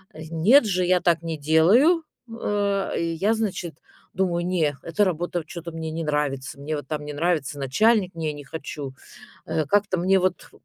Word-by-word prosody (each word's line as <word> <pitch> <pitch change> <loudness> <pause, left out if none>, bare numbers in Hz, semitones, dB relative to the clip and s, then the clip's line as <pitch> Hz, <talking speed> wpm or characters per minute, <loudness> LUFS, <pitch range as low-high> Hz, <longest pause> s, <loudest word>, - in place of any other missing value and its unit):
Нет 165 - +4
же, 185 -3 0
я 180 0 +3
так 170 -1 +2
не 165 -2 -4
делаю, 200 - +4 0.2
э. 205 -3 -1 0.2
Я, 200 +7 +1
значит, 190 -7 -3 0.4
думаю, 175 -2 0
не, 160 -6 +1
эта 205 +5 +1
работа 175 -1 -2
чё-то 170 0 -7
мне 160 0 -5
не 165 +1 -3
нравится. 145 -3 -2
Мне 155 +2 -3
вот 145 - -6
там 150 -1 -4
не 150 - -6
нравится 150 -2 -1
начальник, 185 - +2
не 155 -2 -2
не 145 -1 -9
хочу. 140 -2 -7 0.5
Э, 160 -1 0
как-то 205 +2 +1
мне 190 +2 +3
вот 185 0 -1
170 Hz, 170 wpm, -24 LUFS, 155-190 Hz, 0.5 s, Нет